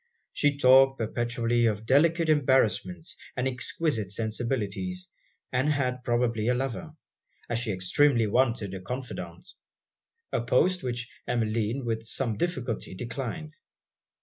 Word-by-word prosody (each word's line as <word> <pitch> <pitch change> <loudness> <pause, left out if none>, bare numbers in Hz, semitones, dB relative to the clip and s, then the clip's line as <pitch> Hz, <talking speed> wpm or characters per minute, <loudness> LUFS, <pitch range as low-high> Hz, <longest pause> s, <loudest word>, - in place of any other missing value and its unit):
She 145 -1 +2
talked 135 0 +6
perpetually 120 +1 0
of 105 0 -2
delicate 165 +6 +4
embarrassments 130 - +2 0.2
and 125 +1 +1
exquisite 125 - -2
sensibilities, 105 -5 -2 0.4
and 130 +4 +1
had 125 -3 -1
probably 120 -2 +1
a 125 - +3
lover, 135 +5 -4 0.5
as 120 -1 -1
she 120 -2 -1
extremely 115 +7 +3
wanted 115 -3 +1
a 95 - -6
confidant; 95 -6 -6 0.8
a - - 0
post 175 +10 +2
which 120 -1 -3 0.2
Emmeline 115 +1 0
with 115 -1 -1
some 115 0 -2
difficulty 120 - -3
declined. 135 - -5
120 Hz, 120 wpm, -28 LUFS, 110-135 Hz, 0.8 s, talked